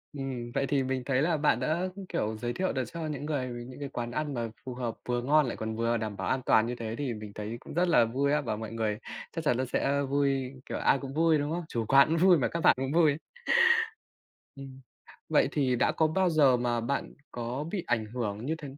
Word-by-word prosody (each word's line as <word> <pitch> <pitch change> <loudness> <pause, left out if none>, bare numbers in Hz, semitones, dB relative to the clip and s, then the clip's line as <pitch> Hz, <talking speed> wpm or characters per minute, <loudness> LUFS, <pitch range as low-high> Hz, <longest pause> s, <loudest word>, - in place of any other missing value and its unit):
Ừm, 130 -4 -4
vậy 140 0 +1
thì 140 -2 +1
mình 130 -1 -2
thấy 130 0 +1
là 160 0 +2
bạn 145 -5 +2
đã, 165 +8 0 0.2
kiểu, 110 +1 -2
giới 120 +1 -3
thiệu 185 +6 -1
được 130 -1 -1
cho 165 -2 -4
những 145 -1 -4
người 135 -5 -2
với 120 0 -7
những 130 +2 -10
cái 140 -1 -5
quán 120 -1 -4
ăn 150 +2 -2
mà 115 -2 -2 0.2
phù 130 - -5
hợp, 120 -3 -3
vừa 120 0 +1
ngon 150 +3 +4
lại - - -4
còn 110 0 -4
vừa 115 +1 +1
đảm 110 -2 -4
bảo - - -3
an 130 - +1
toàn 110 - +4
như 125 - -3
thế 115 -1 -5
thì 140 -4 -2
mình 105 -1 -8
thấy 105 +2 -5
cũng - - -11
rất 175 +2 +2
là 140 -9 +5
vui 135 +5 0
á. 150 - +2
Và 115 -6 -2
mọi 110 0 -6
người 110 -2 -1 0.3
chắc 165 - -4
chắn 125 - +3
là 130 - 0
sẽ 140 +2 0
vui, 135 -2 0
kiểu, - - -4
ai 135 - +3
cũng 135 -1 -7
vui, 160 +1 +4
đúng 145 +1 -2
không? 170 0 -3
Chủ 115 -2 -2
quán 140 +2 +6
cũng 165 - +1
vui 180 0 +6
mà 135 - +1
các 170 - -3
bạn - - +6
cũng 135 +1 -2
vui. 155 -4 +4 1.4
Ừm, 135 -1 -10 0.5
vậy - - +3
thì 130 -4 +1
đã - - +2
có 160 - +2
bao 180 +3 +1
giờ 145 -5 +5
mà 120 -1 0
bạn 130 +5 -3 0.2
có 120 +4 -4
bị 190 -4 -2
ảnh 115 -3 0
hưởng 110 0 -4
như 160 - 0
th 160 - -11
130 Hz, 255 wpm, -29 LUFS, 120-150 Hz, 1.4 s, quán